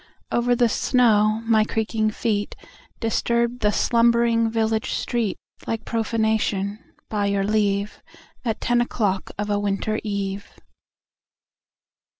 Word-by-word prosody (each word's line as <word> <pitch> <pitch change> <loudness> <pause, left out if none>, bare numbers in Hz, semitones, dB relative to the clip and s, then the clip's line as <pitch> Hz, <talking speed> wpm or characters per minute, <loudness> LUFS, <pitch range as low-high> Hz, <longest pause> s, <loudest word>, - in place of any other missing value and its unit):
Over 245 +1 +2
the 240 0 +3
snow 220 -2 +2
my 220 -1 +4
creaking 220 0 -1
feet 210 -1 -2 0.4
Disturbed 235 +1 0
the 210 -2 +2
slumbering 235 0 +3
village 220 -1 0
street 230 -5 -1 0.3
Like 225 -1 -3
profanation, 220 -3 0 0.3
by 205 -2 -1
your 200 -1 +1
leave, 205 0 0 0.4
At 225 -3 -2
ten 240 0 +2
o'clock 205 -5 -1
of 210 +1 -2
a 205 - +1
winter 205 +2 -1
eve. 200 -1 -4
220 Hz, 115 wpm, -23 LUFS, 205-230 Hz, 0.4 s, my